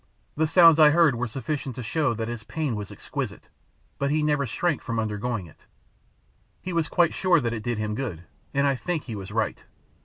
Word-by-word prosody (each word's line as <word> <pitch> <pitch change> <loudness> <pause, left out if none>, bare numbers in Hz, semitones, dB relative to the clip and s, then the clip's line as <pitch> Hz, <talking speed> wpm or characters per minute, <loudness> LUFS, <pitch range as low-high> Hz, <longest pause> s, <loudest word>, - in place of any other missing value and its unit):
The 160 +1 +2
sounds 165 -1 +7
I 155 -1 +9
heard 160 -2 +5
were 120 +1 -2
sufficient 135 +1 -4
to 125 - -5
show 145 0 0
that 115 0 -3
his 120 -2 -5
pain 150 0 -2
was 105 -1 -5
exquisite, - - -6 0.5
but 140 - +1
he 150 +1 +1
never 145 -2 +1
shrank 150 +8 -1
from 115 -2 -4
undergoing 110 -1 -2
it. 80 - -19 0.9
He 185 - -5
was 165 -2 +1
quite 175 -2 +2
sure 185 -3 +3
that 120 -4 -1
it 110 - -4
did 120 0 -2
him 105 0 -2
good; 105 -9 -4 0.3
and 140 0 +1
I 140 - +3
think 165 +4 -3
he 115 - -6
was 95 -2 -7
right. - - -1
135 Hz, 210 wpm, -25 LUFS, 115-155 Hz, 0.9 s, I